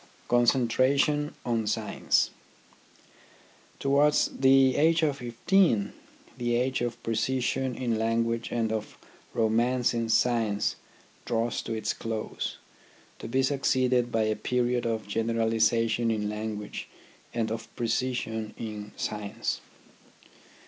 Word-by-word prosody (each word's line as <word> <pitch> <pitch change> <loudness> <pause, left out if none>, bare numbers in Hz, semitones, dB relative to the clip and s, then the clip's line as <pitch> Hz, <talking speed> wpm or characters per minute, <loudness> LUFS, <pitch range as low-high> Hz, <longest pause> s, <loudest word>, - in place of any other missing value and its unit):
CONCENTRATION 130 +5 +2
ON 115 -3 0
SCIENCE - - +1 1.5
Towards 145 +2 +3
the 135 -1 +5
age 165 +2 +3
of 145 -3 +1
fifteen 120 - +2 0.5
the 120 -1 0
age 130 +2 0
of 120 0 -3
precision 125 +2 0
in 115 -3 -1
language 115 +1 0
and 115 -2 0
of 110 -1 -4 0.4
romance 120 +2 +2
in 115 -1 -1
science 110 -3 +2 0.5
draws 115 0 -1
to 115 - -4
its 110 - -1
close, 110 -1 -4 0.6
to - - -6
be 130 +3 +1
succeeded 130 -3 +2
by 115 -1 +2
a 110 0 +1
period 120 +2 0
of 110 -1 -2
generaliza 115 +1 +1
tion 115 +1 0
in 105 -2 0
language 105 0 -5 0.4
and 115 -2 -1
of 115 0 -4
precision 115 -2 -2
in 105 -2 -6
science. 105 -1 -3
115 Hz, 115 wpm, -28 LUFS, 110-130 Hz, 1.5 s, the